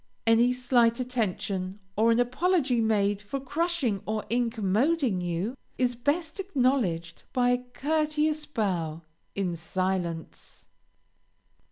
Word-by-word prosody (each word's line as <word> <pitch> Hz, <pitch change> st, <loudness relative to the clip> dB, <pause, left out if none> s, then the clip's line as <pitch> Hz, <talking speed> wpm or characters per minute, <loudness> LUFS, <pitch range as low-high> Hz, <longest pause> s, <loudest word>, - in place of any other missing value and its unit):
Any 230 Hz, +2 st, +5 dB
slight 245 Hz, -2 st, +3 dB
attention, 200 Hz, -6 st, -2 dB, 0.2 s
or 220 Hz, +2 st, +3 dB
an 230 Hz, +1 st, +4 dB
apology 255 Hz, 0 st, +2 dB
made 205 Hz, -2 st, +1 dB
for 210 Hz, +7 st, -4 dB
crushing 285 Hz, -, -1 dB
or 215 Hz, 0 st, -1 dB
incommoding 235 Hz, -, +1 dB
you, 175 Hz, +7 st, -2 dB, 0.2 s
is 250 Hz, -1 st, +2 dB
best 300 Hz, -, -1 dB
acknowledged 250 Hz, -, 0 dB
by 245 Hz, -1 st, +3 dB
a 245 Hz, -, +2 dB
courteous 305 Hz, +1 st, 0 dB
bow, 175 Hz, -, -2 dB, 0.3 s
in 185 Hz, -3 st, -1 dB
silence. 175 Hz, -1 st, -3 dB
235 Hz, 110 wpm, -28 LUFS, 195-275 Hz, 0.3 s, Any